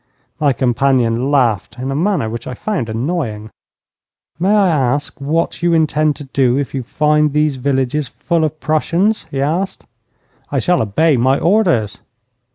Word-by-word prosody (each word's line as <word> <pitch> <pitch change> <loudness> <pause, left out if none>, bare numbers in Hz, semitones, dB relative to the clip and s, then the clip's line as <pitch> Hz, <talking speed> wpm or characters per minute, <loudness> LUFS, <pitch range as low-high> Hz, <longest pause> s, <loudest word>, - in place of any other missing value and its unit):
My 145 -2 +3
companion 125 -1 +1
laughed 120 -6 +1
in 130 +2 -4
a - - -2
manner 180 - 0
which 115 +1 -6
I 125 - -5
found 175 - -3
annoying. 110 -4 -3 0.9
'May 185 +3 +1
I 200 -2 +4
ask 140 -2 -1
what 160 +5 -1
you 170 -1 +2
intend 155 -1 +2
to 150 - -9
do 130 -2 +1
if 140 -5 -3
you 135 - -2
find 150 +3 +1
these 150 -2 +1
villages 135 +2 -1
full 165 +5 -1
of 155 0 -2
Prussians?' 170 +7 0
he 135 - -4
asked. 165 +8 -2 0.7
'I - - -1
shall 180 -1 +2
obey 140 +8 +2
my 130 +3 +3
orders.' 170 - +1
140 Hz, 160 wpm, -17 LUFS, 125-160 Hz, 0.9 s, I